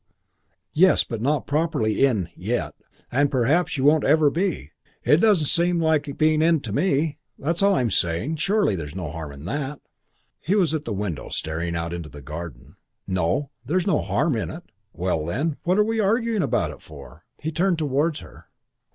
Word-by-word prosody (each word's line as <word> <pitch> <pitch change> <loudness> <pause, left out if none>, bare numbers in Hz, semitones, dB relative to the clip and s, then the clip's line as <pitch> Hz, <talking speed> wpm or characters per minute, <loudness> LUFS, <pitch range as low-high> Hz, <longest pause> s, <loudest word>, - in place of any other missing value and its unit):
"Yes, 185 +4 +5
but 115 -2 -6
not 145 +3 0
properly 145 -8 0
in 105 -11 +2
yet. - - -2 0.4
And 140 +3 +2
perhaps 145 +7 +1
you 130 - -1
won't 150 +1 +5
ever 150 0 +4
be. 170 - -2 0.3
It 150 - +5
doesn't 195 -5 +4
seem 170 +3 +2
like 155 -3 0
being 155 0 +3
in 165 0 +4
to 110 -6 -6
me. 150 - +1 0.2
That's 165 +5 -1
all 200 0 +4
I'm 120 -7 +1
saying. 90 - 0
Surely 195 - +1
there's 75 -4 -6
no 90 -6 -4
harm 80 -2 -6
in 70 +2 -11
that?" 140 +6 -3 0.6
He 190 - 0
was 180 -6 +2
at 155 -1 -2
the - - -4
window 100 - -3
staring 85 +2 -3
out 85 +1 -3
into 85 -3 -6
the 75 -2 -11
garden. 75 -3 -8 0.3
"No, 95 - -1
there's 180 +3 0
no 190 -7 +2
harm 150 -1 0
in 105 -7 -2
it." - - -8 0.3
"Well, 90 -3 -1
then. 140 - -2
What 180 +3 +2
are 210 - +5
we 225 0 -1
arguing 225 +1 +1
about - - 0
it - - -13
for?" - - -13 0.2
He 160 - -3
turned 175 +2 +1
towards 150 +1 0
her. - - -15
145 Hz, 185 wpm, -24 LUFS, -, 0.6 s, Yes